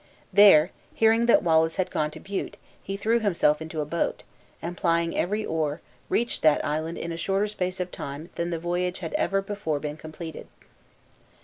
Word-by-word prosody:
There, 190 -5 +7 0.2
hearing 225 +1 +4
that 235 - +5
Wallace 160 -1 +3
had 185 -1 -1
gone 150 0 0
to - - -11
Bute, 195 0 -5 0.2
he 195 0 -5
threw 225 +3 +2
himself 170 -8 +2
into 160 -1 -4
a - - -2
boat, 170 +3 -2 0.4
and 175 +2 -5
plying 170 -2 +1
every 210 +5 0
oar, 155 -1 -1 0.3
reached 235 +1 0
that 155 -2 +4
island 155 +3 -2
in 170 - -4
a 165 - -4
shorter 195 +4 0
space 185 -3 -3
of 180 0 -3
time 145 +4 -7
than 170 0 -2
the 170 - -2
voyage 175 +2 -2
had - - -5
ever 195 -10 +1
before 195 -7 -2
been 150 +1 -5
completed. 160 0 -8
170 Hz, 185 wpm, -26 LUFS, 160-195 Hz, 0.4 s, There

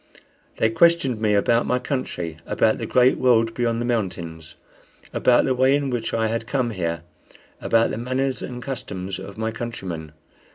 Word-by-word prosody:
They 110 - +2
questioned 140 -5 +3
me 105 -2 +2
about 115 +4 +2
my 125 - +2
country, 120 - -3
about 110 - +2
the - - -4
great 125 +1 +4
world 115 -3 +3
beyond 115 -1 0
the 120 - -1
mountains, 85 -9 -3 0.6
about 125 -1 +4
the 130 - +2
way 130 +2 +4
in 140 -2 -1
which 115 -2 -2
I 115 -1 0
had 115 +1 -2
come 125 -3 0
here, 85 -4 -3 0.6
about 115 0 +2
the - - -3
manners 130 +3 -1
and 125 -1 -6
customs 100 -8 -5
of 100 +1 -9
my 110 0 -1
countrymen. 95 -10 -6
115 Hz, 170 wpm, -23 LUFS, 100-125 Hz, 0.6 s, great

